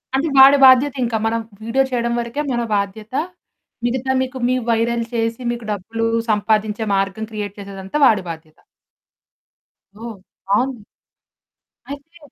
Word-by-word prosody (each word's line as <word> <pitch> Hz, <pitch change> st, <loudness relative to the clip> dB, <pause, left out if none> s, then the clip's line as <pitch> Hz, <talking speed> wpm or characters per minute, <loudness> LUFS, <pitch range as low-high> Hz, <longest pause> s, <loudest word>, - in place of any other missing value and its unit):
అంటే 290 Hz, +4 st, +1 dB
వాడి 275 Hz, +2 st, +9 dB
బాధ్యతింకా 255 Hz, -3 st, +4 dB
మనం 230 Hz, +1 st, 0 dB, 0.2 s
వీడియో 255 Hz, +4 st, +1 dB
చేయడం 235 Hz, -1 st, 0 dB
వరకే 235 Hz, +5 st, -3 dB
మన 240 Hz, -, 0 dB
బాధ్యత. 205 Hz, +3 st, -4 dB, 0.7 s
మిగతా 260 Hz, +2 st, -1 dB
మీకు 260 Hz, 0 st, -4 dB
మీ 255 Hz, -, +2 dB
వైరల్ 230 Hz, +1 st, +1 dB
చేసి, 230 Hz, +1 st, -1 dB
మీకు 235 Hz, -2 st, -6 dB
డబ్బులు 225 Hz, +3 st, -3 dB, 0.3 s
సంపాదించే 215 Hz, +1 st, 0 dB
మార్గం 195 Hz, +3 st, -2 dB
క్రియేట్ 205 Hz, -1 st, -5 dB
చేసేదంతా 195 Hz, +3 st, -6 dB
వాడి 210 Hz, -6 st, +4 dB
బాధ్యత. 160 Hz, -1 st, -12 dB, 1.5 s
ఓహ్! 225 Hz, -5 st, -7 dB, 0.3 s
బావుంది. 240 Hz, +5 st, 0 dB, 1.1 s
అయితే 285 Hz, +4 st, -10 dB
230 Hz, 120 wpm, -19 LUFS, 210-255 Hz, 1.5 s, వాడి